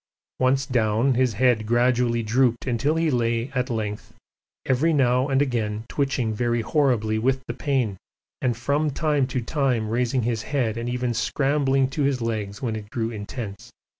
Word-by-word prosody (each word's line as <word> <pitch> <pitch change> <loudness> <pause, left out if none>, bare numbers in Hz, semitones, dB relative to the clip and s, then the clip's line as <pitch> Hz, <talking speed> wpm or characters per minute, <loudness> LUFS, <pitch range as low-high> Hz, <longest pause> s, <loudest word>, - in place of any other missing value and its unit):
Once 130 +1 +2
down, 120 0 +2
his 125 -1 +2
head 115 -1 +2
gradually 120 0 +2
drooped 120 +1 +1
until 130 +5 0
he 165 -1 +1
lay 115 0 0
at 125 -1 -1
length, 110 0 -4 0.5
every 135 +6 +2
now 130 -3 +2
and 135 0 +3
again 110 -5 -2
twitching 135 -5 -1
very 120 +1 0
horribly 115 -6 +1
with 130 +3 +1
the - - -4
pain 130 -9 -1 0.4
and 120 -3 0
from 145 +5 0
time 145 -2 +1
to 130 -1 -2
time 125 -5 0
raising 125 +2 0
his 115 -1 -1
head 120 -6 -1
and 115 +1 -3
even 125 -1 -1
scrambling 135 +1 +1
to 135 +3 -4
his 140 -2 +1
legs 110 -3 -3
when 115 -3 -1
it 105 -1 -7
grew 115 0 -2
intense. 105 -1 -7
125 Hz, 165 wpm, -24 LUFS, 115-135 Hz, 0.5 s, and